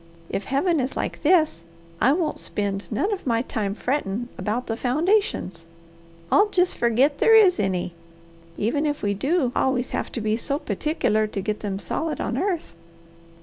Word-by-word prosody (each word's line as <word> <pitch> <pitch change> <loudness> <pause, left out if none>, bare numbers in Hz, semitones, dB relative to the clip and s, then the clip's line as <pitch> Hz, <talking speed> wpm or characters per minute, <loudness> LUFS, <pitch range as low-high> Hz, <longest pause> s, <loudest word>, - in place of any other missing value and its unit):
If 195 - -2
Heaven 310 +5 +1
is 260 +1 -2
like - - -3
this, 310 - +3 0.4
I 265 - +5
won't 320 +1 0
spend 200 0 -3
none 380 - 0
of 375 -8 -6
my 230 -1 +2
time 205 -6 -2
frettin' 240 -3 -2
about 225 +4 -2
the 225 - -2
foundations. 265 - 0 0.6
I'll 415 +1 +5
jest 360 -2 +2
forget 250 +5 +2
there 450 - +6
is 390 - +6
any, 185 -3 -1 0.6
even 285 +8 0
if 290 0 -3
we 200 0 +1
do 270 - +1
always 260 -1 +1
have - - -3
to - - -3
be 215 0 0
so 280 +4 -1
perticler 215 - 0
to - - -3
get 210 +2 -2
them 200 -2 -3
solid 315 +9 -3
on - - -2
earth. 370 -4 -2
250 Hz, 170 wpm, -24 LUFS, 210-315 Hz, 0.6 s, there